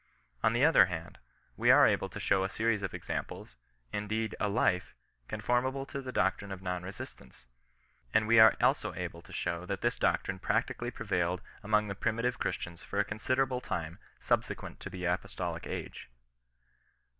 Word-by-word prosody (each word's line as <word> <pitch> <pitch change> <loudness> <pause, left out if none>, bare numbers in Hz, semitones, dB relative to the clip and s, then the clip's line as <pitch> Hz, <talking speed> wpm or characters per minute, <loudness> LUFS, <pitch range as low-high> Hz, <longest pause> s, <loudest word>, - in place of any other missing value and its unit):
On 110 - +3
the 120 +5 +4
other 160 - +7
hand, 85 -2 -6 0.4
we - - +2
are - - +8
able - - +2
to - - -7
show 95 -1 +2
a 95 - -1
series 110 0 0
of 95 - -3
examples, - - -5 0.4
indeed 110 +1 -1
a 105 - +1
life, 100 -4 +1 0.3
con - - -5
formable 130 +3 +1
to 140 - -4
the 130 -1 -6
doctrine 95 -2 0
of 95 - -5
non 90 -1 -2
resistance. 90 -7 -10 0.7
And 110 - +3
we 115 0 +6
are 110 -1 +9
also - - +2
able - - -5
to - - -16
show 85 +1 -2
that 100 0 -3
this 120 - +1
doctrine 95 - 0
practically 115 +4 0
prevailed 90 -6 -1 0.2
among 105 0 +2
the 100 - -3
primitive 115 +5 -1
Christians 85 -2 -3
for 100 - -6
a 100 - +3
considerable 130 +4 0
time 85 -7 -4 0.2
subsequent - - -1
to - - -7
the 90 -1 -5
apostolic 90 -1 -2
age. - - -6
100 Hz, 170 wpm, -31 LUFS, 90-115 Hz, 0.7 s, are